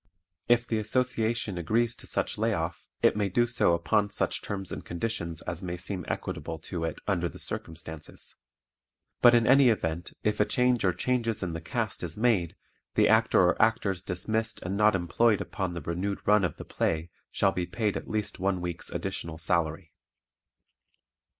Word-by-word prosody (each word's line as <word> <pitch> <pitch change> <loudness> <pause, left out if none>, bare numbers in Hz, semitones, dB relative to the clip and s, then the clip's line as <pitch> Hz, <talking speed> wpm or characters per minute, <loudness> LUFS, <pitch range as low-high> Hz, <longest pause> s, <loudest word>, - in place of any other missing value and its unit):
If 120 0 +4
the 110 -2 0
Association 110 -3 0
agrees 115 +7 +1
to - - -6
such - - -2
lay - - +2
off - - -4 0.2
it - - +5
may 105 -2 0
do 120 +6 +3
so 120 -7 +3
upon 105 +5 +1
such 105 - 0
terms 95 -2 -3
and - - -5
conditions 85 -3 -3
as 85 -1 -4
may 90 -1 -4
seem 90 -1 -4
equitable 80 -1 -4 0.2
to 85 -2 -1
it 80 - -3
under 90 -4 +1
the - - -11
circumstances. 80 -1 -6 0.9
But 120 -1 +8
in 115 -1 +4
any 135 +1 +6
event 85 -5 -1
if 105 -1 0
a 105 - +5
change 125 -1 +2
or 90 - +4
changes 115 0 -1
in 85 -2 -3
the 80 - -5
cast 110 +4 -3
is 85 0 -5
made 105 -8 +2 0.4
the - - +5
Actor - - +4
or 90 - +1
Actors 110 -4 +2
dismissed 110 +5 -2
and 95 +2 -2
not 105 0 +4
employed 100 +5 +2
upon 95 -3 -3
the 85 - -5
renewed 90 +6 -2
run 105 -1 +5
of 85 -5 -1
the - - -8
play 80 +1 -1 0.2
shall 95 - +2
be 90 -2 -2
paid 110 -3 -1
at - - -5
least 105 -2 -2
one 95 0 +1
week's 90 -1 -4
additional 80 -1 -4
salary. 80 0 -1
100 Hz, 180 wpm, -28 LUFS, 85-110 Hz, 0.9 s, But